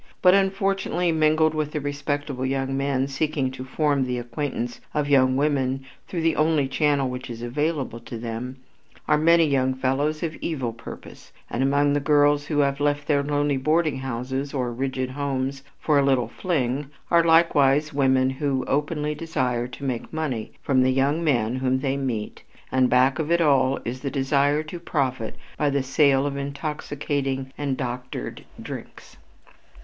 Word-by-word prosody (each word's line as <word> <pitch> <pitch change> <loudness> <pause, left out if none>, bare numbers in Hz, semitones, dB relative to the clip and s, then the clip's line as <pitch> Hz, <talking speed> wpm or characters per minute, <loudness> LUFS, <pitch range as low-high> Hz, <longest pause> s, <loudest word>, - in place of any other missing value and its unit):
But, 180 0 +7
unfortunately, 195 -2 +1
mingled 155 0 +3
with 155 -1 -2
the 155 - -1
respectable 145 -1 -3
young 135 0 -1
men 135 -1 0
seeking 140 -1 -1
to 130 - -7
form 140 +1 +1
the 125 -1 -2
acquaintance 120 0 -4
of 150 -1 +1
young 130 -2 +4
women 135 -2 0 0.2
through 170 -3 -3
the 165 -1 +2
only 155 -3 +2
channel 145 -1 +1
which 125 0 -6
is 120 0 -7
available 140 -1 -2
to 115 0 -8
them, 115 +3 -5 0.5
are - - +4
many 165 +1 +5
young 130 -3 +1
fellows 140 +4 0
of 160 -2 -2
evil 130 -8 -3
purpose, 115 +1 -11 0.2
and 120 - -1
among 140 +1 +3
the 145 - +2
girls 145 0 +3
who 150 - -1
have 140 0 0
left 145 0 0
their 145 -2 +2
lonely 145 0 0
boarding 155 +2 +1
houses 130 +2 -4
or 125 -3 -1
rigid 130 +1 -2
homes 135 -1 -2 0.2
for 150 -2 +3
a - - +3
"little 130 -4 +2
fling" 135 -2 -2 0.2
are 170 -1 +5
likewise 155 -3 +4
women 130 -2 +3
who 135 -1 -1
openly 150 +1 0
desire 130 -6 -1
to 125 +3 -11
make 125 -4 -3
money 145 -9 -3
from 130 -2 +3
the 130 - +3
young 140 +5 +1
men 125 -5 +1
whom 130 0 +1
they 135 0 -1
meet, 125 -6 -3 0.3
and 130 -1 +3
back 130 +3 +3
of 155 -1 -2
it 170 - +4
all 135 -4 +3
is 125 +2 -4
the 140 - -3
desire 140 +2 +1
to 165 +3 -7
profit 130 -8 -2 0.2
by 145 - +2
the 140 -1 0
sale 135 0 +3
of 140 -1 -2
intoxicating 140 -2 -3
and 140 -3 -2
"doctored" 125 -1 -5 0.2
drinks. - - -9
140 Hz, 170 wpm, -24 LUFS, 130-150 Hz, 0.5 s, But